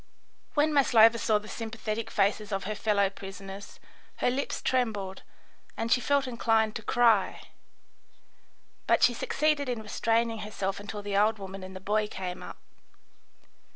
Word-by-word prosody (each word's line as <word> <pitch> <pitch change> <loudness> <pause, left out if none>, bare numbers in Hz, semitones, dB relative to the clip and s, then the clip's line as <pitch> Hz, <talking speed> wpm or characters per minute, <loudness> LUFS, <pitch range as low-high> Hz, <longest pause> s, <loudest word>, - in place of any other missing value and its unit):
When 300 +1 +3
Maslova 230 -5 +6
saw 215 -2 +2
the 210 0 -8
sympathetic 225 0 -4
faces 205 +1 0
of 195 -1 -2
her 215 - -3
fellow 205 -1 +2
prisoners, 195 0 -9 0.4
her - - +1
lips 275 +3 -2
trembled 210 -7 -1 0.6
and 230 +1 -2
she 250 - +4
felt 280 0 +1
inclined 225 -3 +1
to - - -9
cry, 235 +1 +3 1.5
but - - +3
she 245 - +6
succeeded 290 +3 0
in 235 -3 -3
restraining 225 +1 0
herself 200 -2 -3
until 205 0 -7
the 200 -1 -3
old 215 +2 +3
woman 195 -1 -8
and 185 0 -9
the - - -6
boy 210 +2 0
came 185 -3 -6
up. - - -9
215 Hz, 150 wpm, -28 LUFS, 200-235 Hz, 1.5 s, Maslova